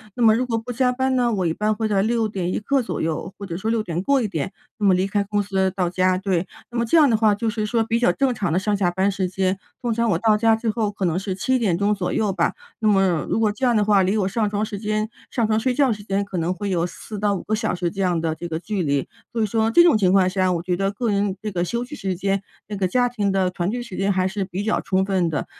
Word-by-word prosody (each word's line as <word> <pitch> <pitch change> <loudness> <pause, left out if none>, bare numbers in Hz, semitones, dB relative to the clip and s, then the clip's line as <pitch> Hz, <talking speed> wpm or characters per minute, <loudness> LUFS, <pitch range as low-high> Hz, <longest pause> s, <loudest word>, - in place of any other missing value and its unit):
那 245 - 0
么 220 -1 +6
如 245 - +1
果 230 -2 0
不 225 +2 -5
加 250 +1 +2
班 260 +1 0
呢， 240 -2 +2
我 190 -4 0
一 160 - +1
般 215 +2 0
会 220 0 -1
在 200 -2 +2
6 225 +1 +1
点 185 -4 -3
一 - - -1
刻 270 +5 +1
左 - - -4
右， 160 +3 -2
或 200 - -7
者 170 -3 -5
说 215 +4 -2
6 225 -1 +1
点 170 -3 -3
过 270 +5 +2
一 - - 0
点， 165 -2 -3 0.3
那 210 - 0
么 185 - +5
离 185 +1 +1
开 200 +1 0
公 205 0 -1
司 190 -1 0
到 180 -2 +1
家， 185 +1 +1
对。 185 -2 -1 0.2
那 240 - -2
么 - - +2
这 235 +8 +3
样 305 -3 +7
的 230 - +3
话 215 -1 +3
就 225 +3 -3
是 215 -1 -2
说 230 +1 +1
比 230 +1 0
较 245 - +4
正 270 -2 +1
常 200 -7 -2
的 165 - +1
上 205 +2 +1
下 195 -3 +1
班 190 +3 +1
时 190 -1 -1
间。 190 +1 -1 0.2
通 240 -2 0
常 230 0 +1
我 170 - +2
到 220 +2 +3
家 225 +1 +3
最 225 0 -1
后 215 -2 -1
可 200 -2 -3
能 175 +1 0
是 190 -1 -3
7 255 +7 +1
点 190 -7 +1
钟 200 +2 +2
左 190 -3 -2
右 210 -3 0
吧。 - - +1 0.3
那 220 - +1
么 190 -5 +2
如 - - +1
果 215 -2 +2
这 205 +5 -9
样 240 - +3
的 210 - +2
话， 205 -2 +4
离 190 +3 +1
我 195 -3 +1
上 210 +2 0
床 210 +1 -1
时 205 -2 -6
间 215 +1 -1 0.2
上 235 -4 0
床 215 0 +1
睡 250 +2 0
觉 270 -4 +3
时 210 - -9
间 200 0 -1
可 190 -3 -4
能 165 +2 0
会 195 +2 -3
有 175 -1 +1
4 210 +3 -8
到 205 0 +1
5 185 - -5
个 215 - -3
小 215 - -1
时 175 -1 -2
这 195 - -4
样 180 -3 +1
的 160 -1 -1
这 165 +2 -6
个 160 -1 -3
距 200 0 -3
离。 140 -3 0 0.2
所 230 - -2
以 - - +3
说 220 +1 +1
这 345 +10 +6
种 345 - +5
情 190 -4 +3
况 190 -1 +4
下， 185 0 +1
我 170 -1 -2
觉 180 0 0
得 195 +2 0
个 225 +2 -2
人 200 -1 0
这 215 0 -5
个 175 -2 -1
休 235 +7 -2
息 295 - -8
时 190 -8 -3
间， 195 +1 -1 0.3
这 210 - -5
个 190 -2 0
家 245 +6 +2
庭 210 -5 -1
的 190 -2 +1
团 175 0 -2
聚 240 +3 -3
时 235 -6 -9
间 195 +1 +1
还 185 -1 +1
是 200 +1 -2
比 190 +1 -4
较 220 - 0
充 190 0 0
分 190 -3 +1
的， 155 - -2
205 Hz, 325 characters per minute, -22 LUFS, 185-225 Hz, 0.3 s, 样